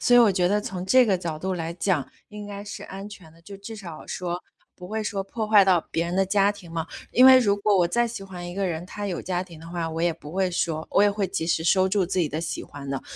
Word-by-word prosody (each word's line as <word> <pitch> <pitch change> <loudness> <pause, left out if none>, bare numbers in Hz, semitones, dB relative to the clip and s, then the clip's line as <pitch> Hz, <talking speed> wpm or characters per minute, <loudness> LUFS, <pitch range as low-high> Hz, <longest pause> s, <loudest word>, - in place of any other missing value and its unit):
所 245 - +5
以 - - +8
我 220 -4 +5
觉 180 -2 +2
得 205 +2 +2
从 185 -3 -5
这 255 +5 +6
个 195 -5 +1
角 165 -3 -4
度 190 +4 -2
来 165 -2 -3
讲， 170 -5 0 0.2
应 210 0 -8
该 200 0 -7
是 205 - -7
安 195 +1 -8
全 195 -6 -12
的。 165 +1 -21
就 200 +4 -10
至 220 +3 -8
少 170 -7 -9
说， 175 0 -4 0.3
不 180 -1 -11
会 220 +2 -2
说 200 -2 -2
破 215 +3 -4
坏 210 -2 +6
到 185 -3 +4
别 165 - 0
人 175 - -3
的 195 - +4
家 200 +1 +3
庭 200 -5 -10
嘛。 165 -1 -2 0.2
因 255 +2 +7
为 260 0 +10
如 205 -5 +2
果 205 0 +2
我 175 -2 +4
再 235 +7 +1
喜 225 -3 -7
欢 180 -2 -8
一 175 - -7
个 195 0 -1
人， 170 -1 -3
他 205 +2 -5
有 180 -3 -3
家 180 -1 -2
庭 175 -4 -12
的 165 - -11
话， 170 -1 -3
我 160 +1 -4
也 170 0 +2
不 155 -2 -11
会 190 0 +1
说 160 -2 -2
我 200 - +4
也 205 - +5
会 200 -1 -1
及 185 -3 -3
时 160 -1 +1
收 185 +2 +3
住 190 -2 +1
自 185 - -2
己 165 - +2
的 155 +2 -3
喜 165 - -4
欢 140 -1 -10
的， 135 -1 -3
185 Hz, 315 characters per minute, -25 LUFS, 170-205 Hz, 0.3 s, 为